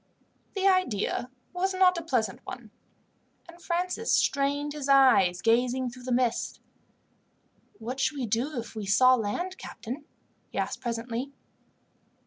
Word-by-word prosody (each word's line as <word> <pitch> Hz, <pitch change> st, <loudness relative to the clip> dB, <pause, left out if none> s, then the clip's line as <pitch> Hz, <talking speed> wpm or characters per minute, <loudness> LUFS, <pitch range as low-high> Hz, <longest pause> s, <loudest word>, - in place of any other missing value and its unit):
The 390 Hz, 0 st, +2 dB
idea 255 Hz, -, +1 dB, 0.2 s
was 375 Hz, +1 st, -1 dB
not 370 Hz, -1 st, +5 dB
a 340 Hz, -, -3 dB
pleasant 245 Hz, -, -1 dB
one, 225 Hz, -4 st, -9 dB, 0.8 s
and 345 Hz, 0 st, -14 dB
Francis 360 Hz, +6 st, -1 dB
strained 285 Hz, +1 st, +1 dB
his 290 Hz, -2 st, -5 dB
eyes, 245 Hz, -10 st, +5 dB
gazing 245 Hz, +2 st, +2 dB
through 250 Hz, 0 st, -12 dB
the 255 Hz, -, -3 dB
mist. 240 Hz, -1 st, 0 dB, 1.2 s
"What 245 Hz, +4 st, -5 dB
should 290 Hz, +2 st, 0 dB
we 260 Hz, -, -1 dB
do 245 Hz, +7 st, -1 dB
if 235 Hz, -, -5 dB
we 215 Hz, -3 st, -5 dB
saw 255 Hz, +6 st, +6 dB
land, 255 Hz, -, -2 dB
captain?" 245 Hz, +6 st, -7 dB, 0.4 s
he -, -, -9 dB
asked -, -, -2 dB
presently. 235 Hz, +3 st, -4 dB
255 Hz, 135 wpm, -28 LUFS, 235-325 Hz, 1.2 s, saw